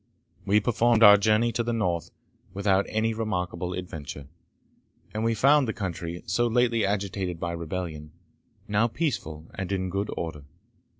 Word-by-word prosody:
We 105 +2 +5
performed 115 +1 +3
our 105 -1 +11
journey 110 +3 +3
to 120 - -1
the 120 0 -1
North 90 -7 -1 0.5
without 100 -1 +2
any 110 +1 0
remarkable 90 -5 -3
adventure, 75 -6 -7 0.9
and 110 +1 -2
we 115 0 +1
found 140 +4 +4
the 110 - -1
country, 85 -3 -5
so 115 +8 +1
lately 120 -1 +2
agitated 95 -3 -2
by 85 0 -2
rebellion, 85 -2 -5 0.6
now 105 +3 +2
peaceful 85 - -3
and 95 0 -5
in 95 -2 -1
good 100 +2 -2
order. 80 -4 -5
100 Hz, 145 wpm, -26 LUFS, 85-115 Hz, 0.9 s, our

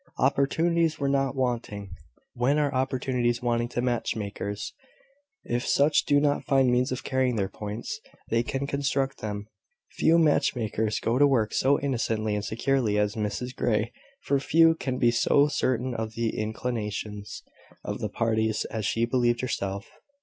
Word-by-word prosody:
Opportunities 160 +4 +2
were 140 - -1
not 135 -1 +1
wanting. 115 -6 -2 0.4
When 125 +5 +1
are 145 -2 +1
opportunities 125 -2 0
wanting 120 -1 +1
to 120 0 -2
match 120 -2 0
makers? 100 -1 -4 0.7
If 120 +1 -2
such 145 +2 +3
do 145 0 +4
not 145 0 +1
find 135 -2 +3
means 125 +2 +2
of 130 - -3
carrying 130 -2 +1
their 100 -3 0
points, 105 - -6 0.3
they 115 +1 +2
can 135 +3 -3
construct 140 -1 -1
them. 105 -1 -4 0.5
Few 165 +1 +3
match 155 -5 +3
makers 110 -2 -1
go 120 +3 0
to 145 - +7
work 115 -6 +1
so 140 +2 +3
innocently 115 -5 -1
and 105 -1 -2
securely 115 -1 0
as 105 0 +1
Mrs 115 +4 -3
Grey; 110 0 0 0.3
for 140 - +1
few 165 +4 +5
can 130 -5 -3
be 120 -2 +4
so 140 +4 +4
certain 130 -3 0
of 110 -1 -4
the 115 -1 -1
inclinations 105 -2 -4 0.4
of - - -4
the - - -2
parties 110 -1 0
as 110 -3 -2
she 115 +1 +1
believed 120 -1 +1
herself. 100 -5 -3
120 Hz, 160 wpm, -27 LUFS, 110-135 Hz, 0.7 s, to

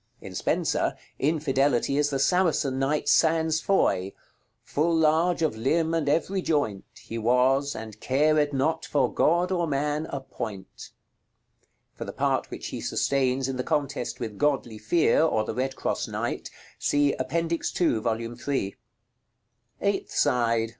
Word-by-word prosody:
In - - -10
Spenser, - - 0 0.2
Infidelity 140 -3 +1
is 145 0 +2
the 140 - -1
Saracen 145 -4 +2
knight 140 +3 0
Sans 160 -1 +3
Foy, 100 - +1 0.5
"Full 165 +3 0
large 160 +2 +2
of 155 -8 +1
limbe 160 +8 +1
and 160 -4 0
every 185 +6 +1
joint 145 - -1
He 115 - -7
was, 130 +4 +2
and 110 -1 -8
cared 150 +3 +2
not 160 +4 0
for 135 -5 0
God 175 +3 +2
or 175 -2 0
man 150 +2 -1
a 140 - -3
point." 100 -7 -8 1.0
For - - -7
the - - -7
part - - 0
which - - -6
he - - -5
sustains 135 -1 0
in 135 -1 -3
the 125 - -1
contest 140 -5 -2
with 110 -5 -5
Godly 135 -7 0
Fear, 120 +12 +3
or 130 -9 +2
the - - -3
Red 130 +3 -2
cross - - -2
knight, - - -3 0.3
see 145 -1 +2
Appendix 165 +5 -1
2, 160 -11 +1
Vol. 115 0 -1
III. - - -4
§ - - -10
LXXVI. 130 -8 -2 1.1
Eighth - - -1
side. 115 -2 +2
140 Hz, 155 wpm, -26 LUFS, 125-160 Hz, 1.1 s, Sans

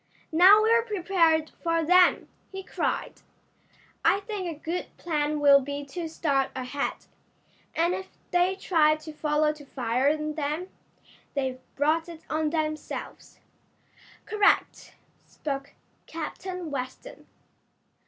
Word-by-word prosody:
"Now 380 +6 +7
we're 460 +1 +4
prepared 355 -7 +1
for 330 -1 +1
them!" 360 +2 +5 0.2
he 385 0 -6
cried. - - -3 0.8
"I 390 - +4
think 405 -3 -4
a 320 -3 -6
good 335 +3 -3
plan 300 -2 -1
will 285 -1 +7
be 285 +1 -5
to 325 +4 -5
start 280 -4 0
ahead, 260 +2 -3 0.7
and 340 +2 +2
if 380 - -5 0.2
they 360 +2 +2
try 320 -5 +3
to 310 0 -10
follow 300 0 +1
to 300 -1 -13
fire 255 0 0
on 305 0 -2
them. 305 +4 -3 0.7
They've 260 -2 -2 0.2
brought 315 +4 +1
it 330 -1 -10
on 310 0 +1
themselves." 310 -1 -4 0.8
"Correct," 425 -2 +1 0.3
spoke 275 -2 -5 0.3
Captain 345 +1 -6
Weston. 260 - -7
315 Hz, 120 wpm, -27 LUFS, 290-360 Hz, 0.8 s, Now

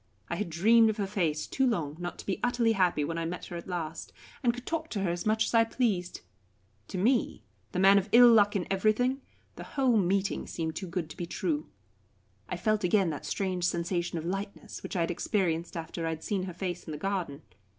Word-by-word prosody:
I - - 0
had 210 - -2
dreamed 220 +7 +5
of 215 - -2
her 205 - 0
face 170 -6 -1
too 265 -1 +1
long 160 - -1
not 175 0 -5
to - - -10
be 195 - -2
utterly 245 -2 +2
happy 180 -7 +2
when 165 +3 -2
I 165 - -2
met 175 +2 -5
her 175 - -8
at 170 - -7
last, 165 -4 -4 0.3
and 245 -4 +3
could 245 +1 -9
talk 320 -1 -3
to 200 - -3
her 175 - +1
as 175 +4 -3
much 220 +1 +3
as - - -4
I 230 -1 +6
pleased. 215 -7 -1 0.7
To - - -5
me, 235 +6 +1 0.3
the - - -4
man 195 +2 +7
of 200 +2 -6
ill 240 0 +8
luck 205 -2 +5
in 185 -4 0
everything, 220 +7 +2 0.4
the - - -6
whole 255 -4 +4
meeting 195 0 0
seemed 160 -1 -3
too 190 - -4
good 170 -1 -3
to - - -11
be 175 -2 -4
true. 160 -3 -2 0.8
I 180 - -3
felt 215 +3 +1
again 180 -1 +3
that 150 - -6
strange 185 -3 -1
sensation 175 0 -1
of 160 - -4
lightness 195 +3 -5
which - - -6
I 175 - +1
had 165 - 0
experienced 170 -3 -1
after 165 0 -4
I - - 0
had 160 -1 -5
seen 195 -3 -1
her 180 - -6
face 180 -1 -4
in 155 - -6
the - - -4
garden. 175 -5 -3
190 Hz, 230 wpm, -29 LUFS, 170-215 Hz, 0.8 s, ill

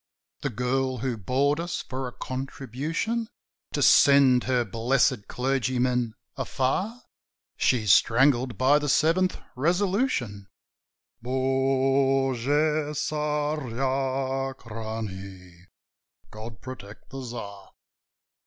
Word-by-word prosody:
"The 140 - -1
girl 130 +2 -1
who 125 +1 -2
bored 135 - 0
us 175 +1 -3
for 130 0 -4
a - - -6
contribution 140 - -4 0.4
To - - +1
send 135 -3 +6
her 125 -2 +1
blessed 125 +1 +1
clergyman 125 -2 0 0.2
afar?" 190 - -2 0.5
"She's 110 -7 +3
strangled 125 -1 +3
by 135 +4 +4
the 145 -1 -2
Seventh 170 +6 +2 0.2
Resolution: 170 - 0 0.8
Bogu 135 +1 +2 0.6
Tsarachnie! 130 - -3 0.6
God 110 -2 -9
protect 120 -5 -10
the 135 0 -6
Tsar!" 100 -5 -8
130 Hz, 85 wpm, -26 LUFS, 115-140 Hz, 0.8 s, send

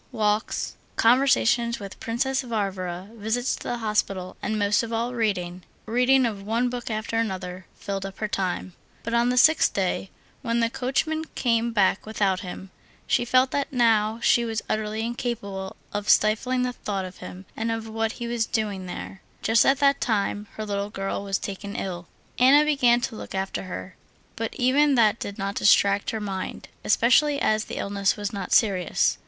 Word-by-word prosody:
Walks, 215 -2 -1 0.2
conversation 235 -1 +3
with 200 -1 -9
Princess 260 +4 -1
Varvara, 195 -5 -3
visits 230 +3 -1
to - - -15
the 240 - -3
hospital, 205 -4 -1
and, 215 +1 -1
most 205 0 +2
of 230 -1 -5
all, 230 +2 -1
reading—reading 225 +5 0
of 210 -4 -3
one 230 +5 0
book 245 -1 -5
after 220 +1 -2
another—filled 190 -1 -4
up 195 - -11
her 215 - -2
time. 185 -2 -2 0.3
But 230 - -4
on 235 +1 +3
the 250 - 0
sixth 315 +5 +5
day, 190 0 -1 0.3
when 235 -1 0
the 230 0 +1
coachman 315 +6 -1
came 235 -1 +1
back 205 -2 +2
without 200 -4 +1
him, 185 0 -8 0.3
she 245 - +1
felt 255 +2 +3
that 280 -1 -1
now 225 -3 +2
she 235 - +4
was 225 -1 -3
utterly 215 0 -2
incapable 205 -5 -4 0.2
of 205 0 -3
stifling 250 +4 +3
the 250 0 -1
thought 200 -5 -3
of 185 0 -10
him 185 +2 -9
and 225 +1 -2
of 225 0 -3
what 225 +1 -2
he 240 - -6
was 235 -1 -1
doing 205 -5 -2
there, 190 +2 -7 0.2
just 225 +2 +4
at 270 - +4
that 280 0 +4
time 205 -2 0
her 215 - -4
little 200 0 -2
girl 195 0 -3
was 195 -1 -1
taken 200 +1 -6
ill. 175 -3 -4 0.3
Anna 280 +4 +6
began 250 -5 +3
to 240 -2 -3
look - - -8
after 190 0 -3
her, 185 0 -7 0.4
but 225 0 -4
even 275 +3 +3
that 225 -2 +4
did 200 - -6
not 195 0 -2
distract 200 0 +3
her 220 - -2
mind, 195 -3 -5
especially 280 +6 +4
as 215 -3 +1
the - - -6
illness 200 0 0
was 205 0 -4
not 195 -2 -5
serious. 190 -6 +2
220 Hz, 175 wpm, -25 LUFS, 200-240 Hz, 0.4 s, Anna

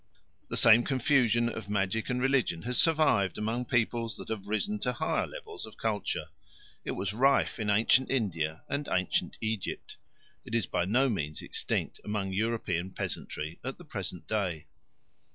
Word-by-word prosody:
The - - -3
same 115 +1 +7
confusion 120 -3 +3
of 110 -3 -5
magic 105 +1 0
and 125 0 0
religion 130 -10 +1
has 125 +2 0
survived 155 - +4
among 115 +4 -1
peoples 115 -1 0
that - - -9
have 105 -3 -4
risen 205 - -1
to 125 -7 -1
higher 120 - 0
levels 440 -5 -6
of - - -13
culture. 105 -3 -2 0.5
It - - -3
was 100 +1 -2
rife 135 +2 +3
in 105 -2 -1
ancient 115 +5 +4
India 85 -11 -1
and 140 +1 -2
ancient 90 -1 0
Egypt; 110 -2 -3 0.5
it 115 - -4
is 115 -5 +2
by 85 - 0
no 125 +8 +3
means 75 - -2
extinct - - -2
among 100 -2 -2
European 95 -4 -1
peasantry 80 -3 -5
at 135 +2 -4
the 175 - -13
present 90 - -5
day. 90 -8 -1
110 Hz, 160 wpm, -30 LUFS, 95-125 Hz, 0.5 s, same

